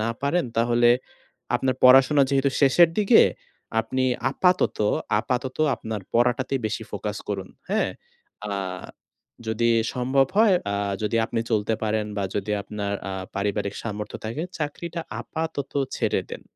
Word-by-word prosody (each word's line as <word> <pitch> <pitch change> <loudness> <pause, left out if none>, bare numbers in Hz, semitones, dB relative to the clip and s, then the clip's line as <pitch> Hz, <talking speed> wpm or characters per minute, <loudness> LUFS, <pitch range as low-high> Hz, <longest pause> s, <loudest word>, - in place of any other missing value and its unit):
না 110 - 0
পারেন, 145 +4 +1
তাহলে 120 +1 +3 0.7
আপনার 130 +1 +1
পড়াশোনা 135 +3 +7
যেহেতু 140 0 +2
শেষের 150 +5 +6
দিকে, 205 -2 +6 0.6
আপনি 130 +4 -2 0.3
আপাতত, 180 +5 +2 0.4
আপাতত 125 +2 -3 0.2
আপনার 110 -1 -5
পড়াটাতে 125 +3 +2
বেশি 110 +1 -3
ফোকাস 105 -1 -4
করুন। 95 -2 -4 0.2
হ্যাঁ? - - +1 0.6
আ - - -5 1.0
যদি 110 +1 +1 0.3
সম্ভব 130 +2 +2
হয়, 215 -2 +6 0.2
আ - - 0 0.3
যদি 110 +2 0
আপনি 115 - -2
চলতে 110 0 +1
পারেন, 110 -1 0
বা 100 - -1
যদি 105 +1 -2
আপনার 100 0 -4 0.2
আ - - -4 0.2
পারিবারিক 100 0 -1
সামর্থ্য 105 -1 -5
থাকে, 115 +8 -3 0.2
চাকরিটা 165 +3 -4 0.2
আপাতত 160 -4 -4 0.2
ছেড়ে - - +1
দেন, - - -7
120 Hz, 135 wpm, -24 LUFS, 105-140 Hz, 1.0 s, পড়াশোনা